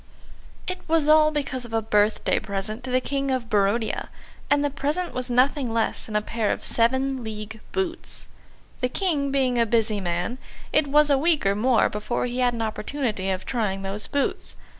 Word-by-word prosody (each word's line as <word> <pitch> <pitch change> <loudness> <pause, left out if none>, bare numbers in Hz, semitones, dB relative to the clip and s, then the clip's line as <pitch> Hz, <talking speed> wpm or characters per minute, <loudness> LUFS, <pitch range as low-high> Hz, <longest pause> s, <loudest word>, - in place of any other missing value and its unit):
It 365 0 -3
was 320 -2 +2
all 305 0 +6
because 280 -4 -3
of 235 -1 -10
a 225 - +2
birthday 210 0 +2
present 215 +3 -4
to - - -4
the 255 0 +3
King 275 +1 -2
of 255 -3 -2
Barodia, 210 +2 +1 0.4
and 290 0 +3
the 290 - 0
present 295 +6 -2
was 255 0 -3
nothing 255 +1 +2
less 225 -1 -1
than 215 - -6
a 210 - +2
pair 220 -1 -1
of - - -3
seven 260 +2 +2
league 215 0 -6
boots. 360 -3 -3 0.5
The 250 - 0
King 290 -4 0
being 260 -3 +1
a 230 - +4
busy 220 -2 +2
man, 175 +7 -2 0.3
it 305 -1 +3
was 295 +1 +4
a 275 - +4
week 320 -3 +2
or 195 - +4
more 230 +3 +3
before 210 +4 -2
he 245 +1 -3
had 245 -1 +2
an 225 - -2
opportunity 220 -3 -2
of 190 0 -2
trying 205 -6 -1
those 195 +2 -2
boots. 285 -1 -2
245 Hz, 190 wpm, -24 LUFS, 215-280 Hz, 0.5 s, all